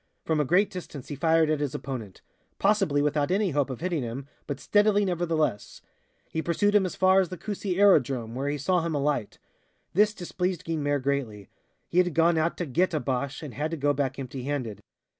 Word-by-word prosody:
From 160 -1 +1
a 150 - +2
great 190 +8 +3
distance 160 -8 -8
he 145 - -4
fired 160 +1 +3
at 155 - +1
his 145 -1 -2
opponent 125 -9 -6 0.3
possibly 195 -8 +2
without 150 0 +1
any 195 0 +1
hope 145 -1 0
of 130 - -6
hitting 175 -4 -1
him, 125 +3 -5 0.2
but 140 -2 -4
steadily 205 +3 +3
nevertheless. 165 - -1 0.5
He 160 - -1
pursued 205 +5 +1
him 200 -3 +4
as - - -7
far 190 0 +5
as 180 - -2
the 185 - -6
Coucy 200 -1 -3
aerodrome, 130 - +3
where 135 +3 -2
he 145 - -1
saw 175 +5 +1
him 165 -1 -2
alight. 145 -6 -1 0.6
This 210 +3 +3
displeased 180 -1 -3
Guynemer 145 -3 0
greatly. 125 -8 -2 0.4
He 175 - +1
had 180 -3 +2
gone 165 0 +4
out 165 +2 0
to 175 - -2
"get" 165 +5 +1
a - - +1
Boche 135 +2 -3
and 145 -5 -7
had 150 +3 -2
to 165 - -4
go 145 0 +2
back 135 -1 -2
empty 130 -1 -6
handed. 130 -8 -3
155 Hz, 205 wpm, -27 LUFS, 140-180 Hz, 0.6 s, far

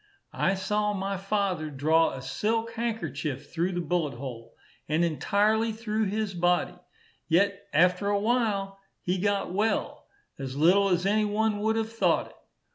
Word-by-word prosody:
I 190 - +1
saw 210 +2 0
my 195 0 -2
father 195 -5 -1
draw 155 +4 +2
a 130 - -7
silk 225 +9 -1
handkerchief 160 - -4
through 175 +3 0
the 175 - -1
bullet 165 -4 -1
hole, 120 -3 -8 0.3
and 160 +3 +2
entirely 210 +7 +1
through 220 0 -2
his 205 0 -2
body; 175 0 +1 0.5
yet 200 +4 +1
after 180 +5 +3
a 205 0 +2
while 205 -4 0 0.2
he 180 +1 0
got 200 -2 0
well, 215 +3 -1 0.3
as 135 -1 -5
little 190 +6 +4
as 180 0 +1
any 210 +2 +2
one 210 0 0
would 220 +1 +1
have 225 0 -2
thought 225 - +1
it. - - -21
195 Hz, 155 wpm, -27 LUFS, 170-215 Hz, 0.5 s, little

